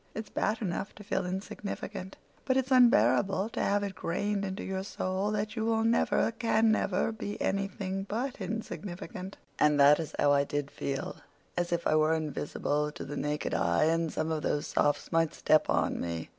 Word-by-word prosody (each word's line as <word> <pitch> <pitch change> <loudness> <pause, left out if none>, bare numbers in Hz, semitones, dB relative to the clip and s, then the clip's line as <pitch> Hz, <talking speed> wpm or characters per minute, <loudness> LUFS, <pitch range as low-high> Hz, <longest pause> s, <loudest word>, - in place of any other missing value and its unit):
It's 220 -1 -6
bad 220 +1 -1
enough 190 +1 -3
to 210 - -11
feel 190 -2 -1
insignificant, 190 0 -5 0.3
but 260 -1 +1
it's 265 0 0
unbearable 220 -5 +4
to - - -3
have 205 0 +1
it 200 -1 -3
grained 200 +4 -2
into 190 +1 -4
your 190 0 -3
soul 190 0 -2
that 215 +1 -2
you 220 - -1
will 225 0 +1
never, 230 0 +2
can 225 -1 +2
never, 200 -1 +1
be 210 -2 -5
anything 195 0 -2
but 240 +2 -3
insignificant, 195 -1 -6 0.2
and 150 -1 +4
that 145 +2 +7
is 160 - -5
how 145 - +4
I 140 0 +4
did 145 0 -3
feel—as 170 +5 -5
if 170 0 -1
I - - +3
were 155 +1 +3
invisible 150 -1 -2
to - - -7
the 145 - -6
naked 150 +1 -2
eye 85 0 +2
and 165 0 +1
some 155 +1 -2
of 155 -1 -1
those 145 - -1
Sophs 145 0 0
might 165 -1 +2
step 155 - +3
on - - +1
me. 85 -1 -4
190 Hz, 185 wpm, -30 LUFS, 155-210 Hz, 0.3 s, that